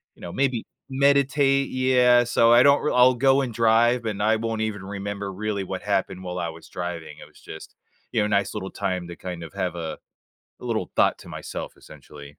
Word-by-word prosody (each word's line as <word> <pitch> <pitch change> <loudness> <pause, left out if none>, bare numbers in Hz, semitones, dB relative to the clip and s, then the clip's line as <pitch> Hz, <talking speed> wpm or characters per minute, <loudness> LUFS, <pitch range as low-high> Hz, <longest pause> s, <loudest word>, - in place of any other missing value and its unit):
you - - -21
know, 85 - -7
maybe 130 -4 0 0.2
meditate. 140 0 +2
Yeah, 125 -1 +4
so 115 0 +3
I 120 - +7
don't 140 0 +5
r - - 0
I'll 125 0 +5
go 135 +2 +3
and 125 -4 -4
drive, 115 +1 +3
and 105 -2 -3
I 110 +1 +3
won't 115 0 -3
even 105 -3 -3
remember 100 0 -5
really 100 0 -3
what 95 0 -5
happened 95 -2 -1
while 90 0 -5
I 85 -1 -2
was 80 0 -12
driving, 90 -2 -6
it - - -12
was - - -21
just, 80 - -11 0.4
you 110 - +1
know, 105 - +1
nice 100 -1 0
little 95 - -5
time 90 -2 -3
to 85 - -7
kind 90 -2 -7
of 80 - -10
have 90 -1 -3
a 80 -2 -5 0.6
a - - -10
little - - -2
thought - - +3
to - - -14
myself, - - -7
essentially. 75 0 -14
105 Hz, 215 wpm, -24 LUFS, 90-125 Hz, 0.6 s, I